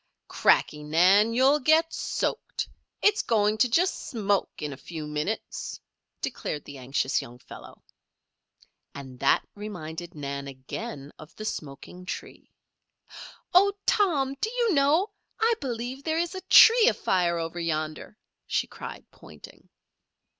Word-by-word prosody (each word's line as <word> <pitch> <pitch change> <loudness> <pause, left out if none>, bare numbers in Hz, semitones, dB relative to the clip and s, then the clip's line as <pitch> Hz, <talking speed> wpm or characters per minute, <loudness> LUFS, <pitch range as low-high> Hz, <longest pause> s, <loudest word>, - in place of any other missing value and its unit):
"Cracky, 150 - +2
Nan! 180 +8 +4
You'll 270 +4 +4
get 320 +4 +3
soaked. - - -3 0.4
It's 415 0 +4
going 215 -1 +1
to 250 - +4
just 355 +10 +1
smoke 205 -4 0
in 150 -2 -4
a 135 - -15
few 160 -2 -5
minutes," 150 +8 -4 0.4
declared 150 - -4
the 140 -2 -10
anxious 130 +1 0
young 120 +1 -11
fellow. 125 - -13 1.1
And 130 -3 -9
that 135 - +2
reminded 175 -5 -7
Nan 140 -1 -5
again 140 +1 -7
of 155 +3 -13
the 215 - -7
smoking 180 +1 -7
tree. - - -7 1.0
"Oh, 400 +3 +6
Tom! 300 -11 +2
Do 440 - +1
you 475 -3 +1
know 305 +8 +3 0.3
I 455 +1 +3
believe 250 +2 -4
there 315 +1 -1
is 340 +2 -1
a 375 - -6
tree 465 0 +8
afire 175 - +1
over 165 +1 -4
yonder," 155 +3 -3 0.3
she - - 0
cried, - - -9
pointing. - - -15
200 Hz, 130 wpm, -27 LUFS, -, 1.1 s, tree